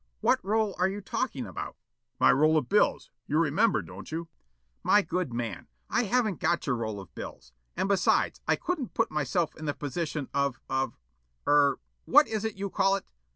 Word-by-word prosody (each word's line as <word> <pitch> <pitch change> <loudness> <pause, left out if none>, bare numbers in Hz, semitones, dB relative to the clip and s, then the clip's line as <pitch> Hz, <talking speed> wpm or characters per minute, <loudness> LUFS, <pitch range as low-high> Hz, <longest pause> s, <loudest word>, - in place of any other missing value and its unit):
"What - - +2
roll 215 +1 +1
are 185 +1 +3
you 200 +2 -4
talking 190 - -3
about?" 90 - -6 0.4
"My - - +6
roll 155 +3 +4
of 145 -6 0
bills, 210 - +2 0.2
you 150 - +1
remember, 165 - +3
don't 90 - -10
you?" 165 +1 -4 0.5
"My 205 - +4
good 180 -7 -2
man, 115 -5 -4 0.2
I 245 - +2
haven't 215 -4 +1
got 170 - +1
your 135 -4 0
roll 110 -3 -3
of 95 - -12
bills. 60 - -9 0.2
And - - +1
besides 195 -2 +2
I - - +4
couldn't 310 -10 -3
put 225 - +1
myself 150 +2 0
in 155 - -7
the 145 - -1
position 150 0 -3
of 140 -2 0
of 130 -2 -1 0.5
er 145 -1 +4 0.3
what 295 +2 +6
is 220 -1 -2
it 220 - -2
you 195 0 -3
call 195 0 +3
it? 195 - -5
160 Hz, 190 wpm, -28 LUFS, 135-200 Hz, 0.5 s, My